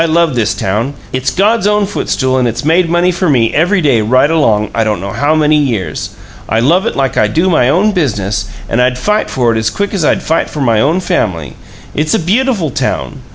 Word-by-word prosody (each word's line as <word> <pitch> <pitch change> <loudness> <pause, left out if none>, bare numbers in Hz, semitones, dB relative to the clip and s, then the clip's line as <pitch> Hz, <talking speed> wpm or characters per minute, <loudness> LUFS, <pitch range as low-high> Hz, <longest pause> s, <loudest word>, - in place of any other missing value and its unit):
I - - +3
love 165 -1 +1
this 120 -4 0
town. 110 +9 -2 0.2
It's 130 +1 -1
God's 205 +2 +1
own 210 0 +2
footstool, 130 -9 -1
and 125 - +1
it's 120 +3 -4
made 165 +2 +2
money 175 +2 +2
for 175 0 -1
me 120 -5 +2
every 180 +5 +2
day 135 -8 +2
right 130 +7 +2
along, 110 -10 +1
I 115 - +1
don't 105 -4 -1
know 100 +2 -5
how 145 +7 0
many 155 -1 +3
years. 110 - -2 0.3
I 110 - +1
love 170 - +2
it - - -3
like 135 -3 -1
I 105 - +3
do 165 - 0
my 125 -6 +3
own 190 +9 +2
business, 105 - -2 0.2
and 120 - 0
I'd 125 0 +1
fight 210 +10 0
for 120 -3 +1
it 110 - 0
as 110 0 0
quick 200 - -3
as 190 -5 -1
I'd - - +1
fight 160 - 0
for 150 - -7
my 115 -5 +2
own 160 +7 +1
family. 80 - -2 0.4
It's 155 +1 0
a - - +1
beautiful 200 - 0
town. - - -3
145 Hz, 230 wpm, -12 LUFS, 115-175 Hz, 0.4 s, I